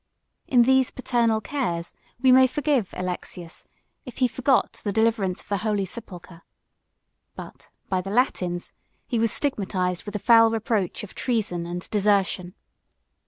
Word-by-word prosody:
In 245 -3 +5
these 265 +1 +3
paternal 235 -3 0
cares, 185 -11 -3 0.3
we 260 0 +4
may 260 0 +7
forgive 275 -6 0
Alexius, 180 -2 -5 0.4
if 250 - -11
he 255 - +3
forgot 260 +2 0
the 205 - -1
deliverance 220 -4 +1
of - - -20
the 200 - +1
holy 210 -2 -1
sepulchre; 180 -5 -11 0.9
but, - - -11 0.2
by 185 -1 0
the 195 - -7
Latins, 185 -6 -1 0.3
he 240 -4 -1
was 225 -1 +2
stigmatized 185 - -1
with 205 - -7
the - - -1
foul 225 +1 +6
reproach 220 -4 -1
of 210 - -9
treason 205 -9 -2
and 175 +1 -5
desertion. 200 -3 +1
210 Hz, 145 wpm, -24 LUFS, 185-245 Hz, 0.9 s, may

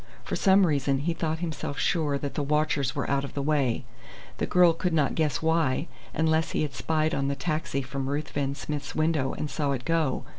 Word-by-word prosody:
For - - -3
some 195 -1 +5
reason 140 -4 +1
he 170 +3 0
thought 160 -1 -1
himself 155 -3 -4
sure 150 -4 +1
that 140 0 -4
the - - -1
watchers 145 -1 +1
were 140 - -1
out 140 0 +1
of 140 - -7
the 140 - -1
way. 140 -5 +1 0.5
The - - 0
girl 180 -2 +5
could 175 +1 -1
not 150 -4 +2
guess 155 -3 0
why, 160 -2 +1 0.2
unless 160 0 +1
he - - +1
had 145 -3 -3
spied 155 +2 0
on 135 0 0
the 140 - 0
taxi 155 -1 -2
from 135 +1 -4
Ruthven 140 -1 -2
Smith's 145 0 -5
window 155 -4 +1
and 150 - -3
saw 145 -1 -1
it 125 -2 -4
go. 160 -5 0
150 Hz, 210 wpm, -27 LUFS, 140-160 Hz, 0.5 s, some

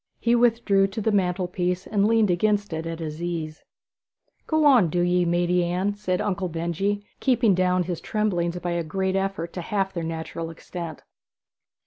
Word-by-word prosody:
He 235 - +2
withdrew 230 -5 +3
to 195 +3 -6
the 220 +1 +1
mantelpiece 180 -1 0
and 205 -1 +1
leaned 220 -3 +3
against 205 +1 +1
it 160 +1 -3
at 165 0 -4
his 160 -1 -6
ease. 165 -3 -4 0.8
'Go 315 -1 +2
on, 245 - +6
do 175 +3 0
ye, 175 0 +2
maidy 175 +1 +2
Anne,' 180 +4 0
said 185 -3 -2
Uncle 185 -2 -1
Benjy, 170 +5 -2
keeping 240 -5 +3
down 180 0 +2
his 175 -1 -4
tremblings 180 -6 -1
by 175 0 -3
a 170 0 -1
great 190 +4 -1
effort 195 -3 -2
to 180 - -4
half 195 +1 -1
their 170 - -3
natural 165 0 -4
extent. 165 -1 -8
180 Hz, 170 wpm, -25 LUFS, 170-205 Hz, 0.8 s, on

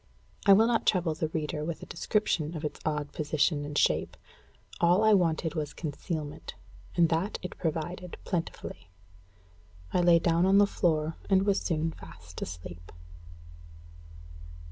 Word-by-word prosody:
I 200 - +10
will 215 +3 +6
not 230 -1 +1
trouble 175 -5 +2
my 160 - +2
reader 150 -1 -3
with 160 +1 -4
a - - -6
description 170 -4 -1
of 155 - -5
its 150 - -4
odd 150 -2 -2
position 150 0 0
and 145 0 -4
shape. - - +1 0.6
All 175 +4 +4
I 220 0 +6
wanted 165 -4 +2
was 150 -3 -4
concealment, 155 0 -5 0.4
and 170 -2 +4
that 170 +6 0
it 180 - -7
provided 170 +2 -3
plentifully. 165 - -4 1.0
I 180 - +3
lay 175 -1 +6
down 170 +1 +2
on 195 +1 +5
the 205 - +7
floor, 160 -5 0
and 190 -1 +4
was 200 -1 +2
soon 160 -1 -1
fast 85 - -12
asleep. 85 0 -8
165 Hz, 145 wpm, -29 LUFS, 150-180 Hz, 1.0 s, I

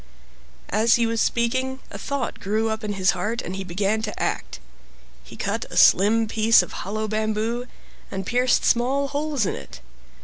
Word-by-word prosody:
As 220 +3 +4
he 235 - +2
was 225 0 0
speaking 260 +3 0
a - - -7
thought 280 -4 -3
grew 215 +3 0
up 220 +1 -3
in 210 -1 -2
his 190 -1 +2
heart, 210 +6 -2
and 180 - -5
he 195 - -4
began 195 +4 -1
to 210 -1 -5
act. - - -3 0.6
He 65 - -13
cut - - -2
a - - -6
slim 220 +4 +5
piece 220 -2 +4
of - - -9
hollow 215 +3 -4
bamboo, 220 +3 -1 0.4
and 195 -1 -5
pierced 250 +4 +2
small 270 +4 +2
holes 290 -4 -1
in - - -1
it. - - -9
220 Hz, 175 wpm, -23 LUFS, 205-240 Hz, 0.6 s, slim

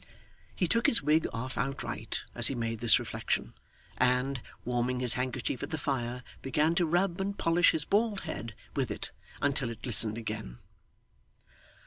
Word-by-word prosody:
He 180 - +1
took 230 +7 +2
his 225 - +4
wig 155 +2 +3
off 125 +3 -4
outright 135 +1 -3
as - - +8
he 135 - 0
made 115 -2 -2
this 120 -1 +6
reflection, - - -2 0.5
and, 125 +1 +2 0.2
warming 125 +1 0
his 125 -2 +3
handkerchief 125 0 -2
at - - -4
the 160 - -2
fire 125 -4 -2 0.2
began 155 +4 +1
to 175 -1 +2
rub 175 +2 +1
and 200 +1 -2
polish 170 +1 +4
his 155 -2 +1
bald 210 0 +1
head 110 +1 -6 0.2
with - - 0
it, - - -5 0.3
until 140 -3 +1
it 115 -1 -9
glistened 110 -3 +4
again. 105 - -5
130 Hz, 160 wpm, -30 LUFS, 120-165 Hz, 0.5 s, as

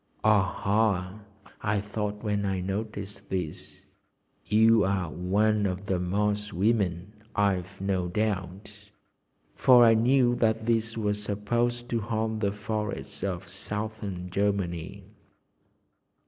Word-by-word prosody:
"Aha!" 100 -1 +2 0.4
I 105 -1 +1
thought 105 +1 -4
when 105 -2 0
I 95 -1 -1
noticed 100 +1 -5
this, 90 -5 -5 0.7
"you 110 0 +5
are 95 -4 0
one 105 +3 +1
of 95 +1 -4
the 95 -2 0
Moss 105 +3 -1
women, 95 -1 0 0.2
I've 100 -1 0
no 95 -2 0
doubt." 100 +1 -3 0.6
For 125 -2 +6
I 115 - +7
knew 120 +2 +4
that 110 -1 +1
these 115 0 0
were 105 -2 +1
supposed 120 +4 -1
to 115 - 0
haunt 110 0 -2
the 100 -2 +1
forests 105 -2 -4
of 90 -3 -3
Southern 100 -1 -5
Germany. 100 -1 -1
105 Hz, 115 wpm, -27 LUFS, 95-110 Hz, 0.7 s, I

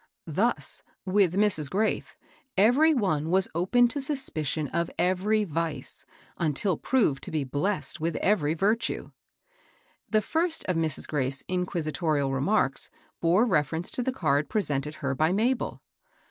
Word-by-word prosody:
Thus, - - -1 0.2
with 185 -2 +2
Mrs. 195 -8 +1
Graith, 215 +3 -1 0.4
every 250 +11 +5
one 165 - 0
was 190 +2 +4
open 190 +9 +3
to 285 +4 -3
suspicion 165 - -1
of 170 0 -1
every 200 +4 +1
vice^ 165 -2 -4 0.3
until 170 +4 +1
proved 200 - +1
to - - -6
be 155 -2 -1
blessed 170 +8 -2
with 165 0 -1
every 165 -7 +1
virtue. 215 +7 0 1.0
The 215 -1 +2
first 325 0 +1
of 185 - 0
Mrs. 160 -3 -1
Graith's 135 -2 -2
inquisitorial 160 -5 -1
remarks 135 +2 +1 0.3
bore 175 +7 +4
reference 160 - 0
to - - -1
the 260 +2 0
card 145 - 0
presented 150 -8 -1
her 135 - +1
by 155 +5 +2
Mabel. 235 +5 0
180 Hz, 135 wpm, -27 LUFS, 155-215 Hz, 1.0 s, every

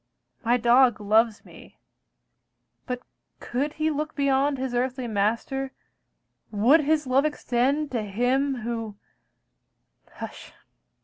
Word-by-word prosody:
My 240 +2 +3
dog 240 0 +4
loves 215 +1 +2
me, - - -15 1.1
but 250 -1 -4 0.4
could 280 +5 -2
he 310 0 0
look 300 +1 -3
beyond 280 0 +2
His 260 -1 -3
earthly 250 0 -1
master, 230 +6 -1 0.8
would 230 +9 +4
his 305 0 +1
love 260 +2 +3
extend 285 0 0
To 240 -3 -1
Him 245 +6 0
who 225 -2 -4 1.2
hush! - - -9
255 Hz, 110 wpm, -25 LUFS, 230-280 Hz, 1.2 s, dog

